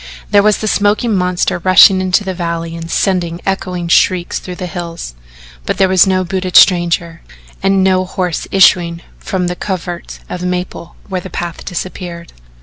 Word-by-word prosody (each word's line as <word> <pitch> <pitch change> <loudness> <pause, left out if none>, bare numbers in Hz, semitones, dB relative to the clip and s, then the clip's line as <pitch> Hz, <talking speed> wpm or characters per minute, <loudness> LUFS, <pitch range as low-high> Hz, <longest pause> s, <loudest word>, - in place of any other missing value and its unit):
There 205 - +6
was 210 0 +3
the 215 - -4
smoking 210 +2 +1
monster 180 -1 0
rushing 185 +1 +6
into 185 +2 +1
the 190 -1 -3
valley 170 -1 -4
and 165 0 -7
sending 175 -2 -1
echoing 180 -2 -3
shrieks 175 +1 +2
through 180 - -8
the 180 - -6
hills 170 - -6 0.5
but - - -2
there 190 - +4
was 185 0 +4
no 185 -1 +1
booted 185 0 -4
stranger 170 -2 +3 0.4
and 195 0 +2
no 185 -1 +2
horse 180 -3 -3
issuing 175 -3 +3 0.2
from 185 -2 -2
the 175 0 -2
covert 175 -3 -5
of 180 - -6
maple 180 -1 -4
where 185 -2 -3
the 190 - -9
path 170 0 -5
disappeared. 175 -1 -6
180 Hz, 165 wpm, -15 LUFS, 170-190 Hz, 0.5 s, There